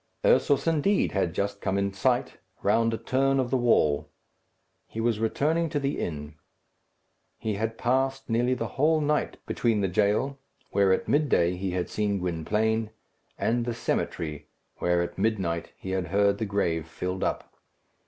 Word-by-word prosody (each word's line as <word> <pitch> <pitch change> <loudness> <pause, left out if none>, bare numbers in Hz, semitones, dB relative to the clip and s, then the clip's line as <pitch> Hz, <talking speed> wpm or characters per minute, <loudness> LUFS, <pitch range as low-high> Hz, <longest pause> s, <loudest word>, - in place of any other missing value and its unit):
Ursus, 145 - +4
indeed, 165 +5 +2
had 90 -4 -1
just 100 0 -2
come 95 - 0
in 100 0 0
sight, 100 - 0 0.2
round 115 +3 +3
a 115 - -1
turn 135 +4 +1
of 125 -2 -1
the - - +2
wall. 75 -12 +2 0.8
He 115 - -7
was 115 -1 +1
returning 155 +9 +1
to 145 - -1
the 140 0 -2
inn. 75 -2 -4 1.0
He 110 - -2
had 110 +2 -2
passed 135 +2 0
nearly 120 +2 +1
the 115 -2 -3
whole 155 +2 +4
night 150 0 0
between 115 -3 +1
the 95 - +2
jail, 105 +9 +1 0.3
where 100 -1 +3
at 95 - +1
midday 130 - +2
he 95 +1 -3
had 90 -1 -1
seen 105 -1 -1
Gwynplaine, 105 +6 0 0.5
and 120 +1 +1
the 120 -1 -3
cemetery, 75 -9 -3 0.3
where 90 0 +1
at 85 0 -6
midnight 90 -7 -1
he 95 - -6
had 95 -2 -1
heard 100 +3 +2
the 110 - -1
grave 85 -6 -1
filled 90 +3 -4
up. - - -2
105 Hz, 165 wpm, -27 LUFS, 95-125 Hz, 1.0 s, Ursus